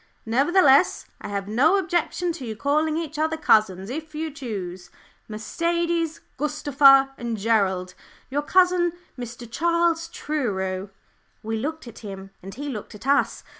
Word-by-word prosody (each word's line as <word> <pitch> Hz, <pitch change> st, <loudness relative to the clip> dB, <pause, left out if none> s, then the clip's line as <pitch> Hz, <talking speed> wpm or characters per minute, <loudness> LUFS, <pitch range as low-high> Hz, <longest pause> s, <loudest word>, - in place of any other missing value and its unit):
Nevertheless, 275 Hz, +6 st, +4 dB, 0.2 s
I -, -, -6 dB
have 200 Hz, -1 st, -3 dB
no 265 Hz, -, +3 dB
objection 355 Hz, -1 st, 0 dB
to 325 Hz, -5 st, -7 dB
your 220 Hz, -3 st, -5 dB
calling 305 Hz, +6 st, +1 dB
each 315 Hz, -2 st, -4 dB
other 320 Hz, +1 st, 0 dB
cousins 215 Hz, -, +2 dB
if 310 Hz, +2 st, -6 dB
you 315 Hz, +1 st, -3 dB
choose. 195 Hz, -10 st, -6 dB, 0.4 s
Mercedes, 335 Hz, +8 st, -1 dB, 0.2 s
Gustava, 275 Hz, -2 st, +5 dB
and 235 Hz, -2 st, -3 dB
Gerald 195 Hz, -4 st, +1 dB, 0.3 s
your 285 Hz, +2 st, -1 dB
cousin, 360 Hz, +1 st, +3 dB, 0.2 s
Mr. 240 Hz, -1 st, -8 dB
Charles 335 Hz, +5 st, +1 dB
Truro." 195 Hz, -10 st, -3 dB, 0.5 s
We 225 Hz, +1 st, -2 dB
looked 310 Hz, +4 st, -4 dB
at 235 Hz, -, -10 dB
him, 195 Hz, -2 st, -8 dB
and 195 Hz, +1 st, -9 dB
he 285 Hz, +2 st, -6 dB
looked 215 Hz, -6 st, -6 dB
at 210 Hz, -, -12 dB
us. 280 Hz, +1 st, +2 dB
275 Hz, 140 wpm, -24 LUFS, 215-320 Hz, 0.5 s, Gustava